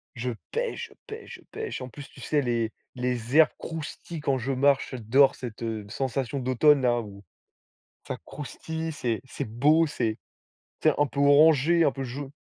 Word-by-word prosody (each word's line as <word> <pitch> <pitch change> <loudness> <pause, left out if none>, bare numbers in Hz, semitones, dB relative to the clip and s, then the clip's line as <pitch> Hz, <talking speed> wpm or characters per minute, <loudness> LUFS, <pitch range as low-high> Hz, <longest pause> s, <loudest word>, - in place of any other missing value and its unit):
Je 125 +1 -2 0.2
pêche, 475 0 -2
je - - -18
pêche, 435 +1 -8
je - - -17
pêche. 440 - -5
En 130 - -6
plus 145 +1 -10
tu - - -16
sais 150 -1 +1
les 115 -3 0 0.2
les 125 +2 -1
herbes 160 -1 +8
croustillent 165 +1 -6
quand 135 -3 +1
je 130 +2 -2
marche, 140 +1 +2
j'adore 130 +3 +4
cette 120 -2 -7
heu, 110 -2 -3
sensation 135 +2 -2
d'automne, 130 +3 +4
là, 120 -1 +2
où 100 -2 -11 0.8
ça - - -3
croustille, 160 +2 -5
c'est 120 -7 -2
c'est 130 - -5
beau, 150 +9 +3
c'est 115 -6 -1 0.7
c'est - - +5
un 145 - +4
peu 140 - -4
orangé, 155 +3 +5
un 140 - +3
peu 135 -1 -5
jau 135 +2 -6
135 Hz, 180 wpm, -27 LUFS, 120-150 Hz, 0.8 s, herbes